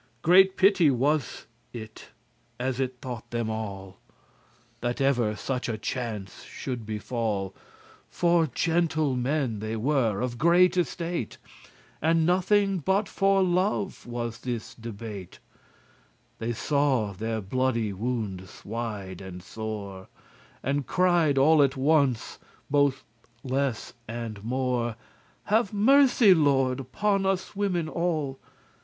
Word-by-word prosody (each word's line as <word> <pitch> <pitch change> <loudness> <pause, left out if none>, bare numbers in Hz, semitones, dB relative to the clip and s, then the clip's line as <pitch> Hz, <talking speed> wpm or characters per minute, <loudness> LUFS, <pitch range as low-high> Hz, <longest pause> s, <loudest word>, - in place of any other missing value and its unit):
Great 190 +3 +6
pity 190 -5 +5
was 140 +2 0 0.3
it 110 -2 -9 0.5
as 130 0 -2
it 130 -1 -2
thought 120 -2 -6
them 115 -2 -2
all, 100 -3 -6 0.8
That 120 0 -2
ever 120 -6 +2
such 125 +3 -3
a 110 - -2
chance 110 -4 -5
should 120 -4 -6
befall, 105 -3 -2 0.6
For 170 -2 +2
gentle 155 0 +1
men 125 -3 -1
they 110 +1 -3
were, 115 -4 +1
of 120 -1 -3
great 175 +2 +5
estate, 170 -6 -2 0.6
And 165 +1 +3
nothing 190 +2 +2
but 190 +6 +1
for 195 0 +2
love 185 0 0
was 120 -1 -4
this 120 -4 -5
debate 110 -4 -8 1.0
They 115 +1 -2
saw 130 -5 +1
their 110 +3 -3
bloody 115 0 -1
woundes 100 -4 -4
wide 105 -4 -5
and 90 -2 -9
sore, 100 -4 -6 0.6
And 140 +1 -1
cried 175 -6 +3
all 150 +3 +6
at 140 -1 +2
once, 140 -4 +1 0.3
both 145 -2 +2 0.4
less 130 -2 -2
and 115 -3 -6
more, 125 -1 -1 0.5
"Have 215 0 +1
mercy, 245 -1 +6
Lord, 135 -5 +2
upon 195 - 0
us 190 +1 -1
women 185 -5 0
all." 155 -5 -2
130 Hz, 115 wpm, -27 LUFS, 110-165 Hz, 1.0 s, Great